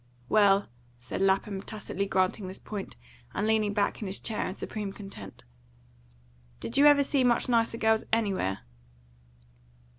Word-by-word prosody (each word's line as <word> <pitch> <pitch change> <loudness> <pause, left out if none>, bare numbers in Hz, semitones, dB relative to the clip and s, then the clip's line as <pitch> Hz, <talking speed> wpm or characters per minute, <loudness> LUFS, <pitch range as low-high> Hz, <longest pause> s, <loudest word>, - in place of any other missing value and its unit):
"Well," 200 -2 +4 0.3
said 125 - -5
Lapham, 195 0 +1
tacitly 200 -2 -4
granting 185 +1 0
this 185 - -6
point, 205 -2 -7 0.4
and 205 - 0
leaning 215 -1 +2
back 205 +1 0
in 210 - -3
his 190 - -2
chair 220 - -2
in 185 - -5
supreme 210 -2 -5
content. 195 - -10 1.2
"Did - - -5
you 285 +1 +7
ever 285 -1 +6
see 275 -1 +1
much 240 -1 +2
nicer 230 -2 +2
girls 220 -1 +2
anywhere?" 195 - 0
205 Hz, 145 wpm, -28 LUFS, 195-220 Hz, 1.2 s, you